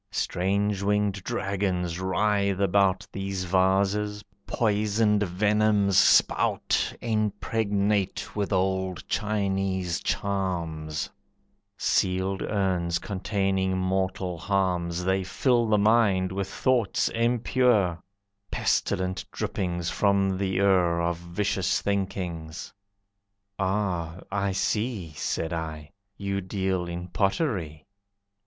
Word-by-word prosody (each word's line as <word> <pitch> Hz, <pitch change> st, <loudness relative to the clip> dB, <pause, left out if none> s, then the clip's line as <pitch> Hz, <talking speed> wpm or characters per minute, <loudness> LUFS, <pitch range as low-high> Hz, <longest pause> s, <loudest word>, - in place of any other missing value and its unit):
Strange 100 Hz, +2 st, 0 dB
winged 100 Hz, -1 st, 0 dB
dragons 95 Hz, -6 st, -1 dB
writhe 100 Hz, +1 st, +1 dB
about 100 Hz, 0 st, +2 dB
These 95 Hz, -1 st, -3 dB
vases, 100 Hz, +3 st, +1 dB, 0.2 s
poisoned 105 Hz, -1 st, +2 dB
venoms 105 Hz, +1 st, +2 dB
spout, -, -, +3 dB
Impregnate 105 Hz, -2 st, -1 dB
with 105 Hz, -1 st, -1 dB
old 95 Hz, -1 st, -1 dB
Chinese 95 Hz, -4 st, -1 dB
charms; 85 Hz, -6 st, -2 dB, 0.7 s
Sealed 95 Hz, 0 st, +1 dB
urns 90 Hz, -4 st, 0 dB
containing 95 Hz, 0 st, -1 dB
mortal 95 Hz, -1 st, -1 dB
harms, 90 Hz, -3 st, 0 dB
They 95 Hz, +1 st, +1 dB
fill 120 Hz, +5 st, +1 dB
the 105 Hz, -1 st, +3 dB
mind 100 Hz, -3 st, +3 dB
with 95 Hz, 0 st, -3 dB
thoughts 120 Hz, -3 st, +1 dB
impure, 115 Hz, -5 st, +2 dB, 0.5 s
Pestilent 95 Hz, 0 st, 0 dB
drippings 90 Hz, -2 st, -2 dB
from 100 Hz, -2 st, +2 dB
the 100 Hz, -, 0 dB
ure 95 Hz, -3 st, +3 dB
Of 85 Hz, 0 st, 0 dB
vicious 90 Hz, +2 st, -1 dB
thinkings. 90 Hz, -5 st, -3 dB, 0.9 s
"Ah, 95 Hz, -4 st, -1 dB
I 100 Hz, 0 st, 0 dB
see," 100 Hz, -1 st, -1 dB
Said 80 Hz, +2 st, -2 dB
I, 80 Hz, -2 st, -5 dB, 0.3 s
"you 100 Hz, -1 st, -2 dB
deal 95 Hz, -1 st, -1 dB
in 85 Hz, +1 st, -6 dB
pottery." 95 Hz, -, -1 dB
95 Hz, 95 wpm, -26 LUFS, 90-105 Hz, 0.9 s, spout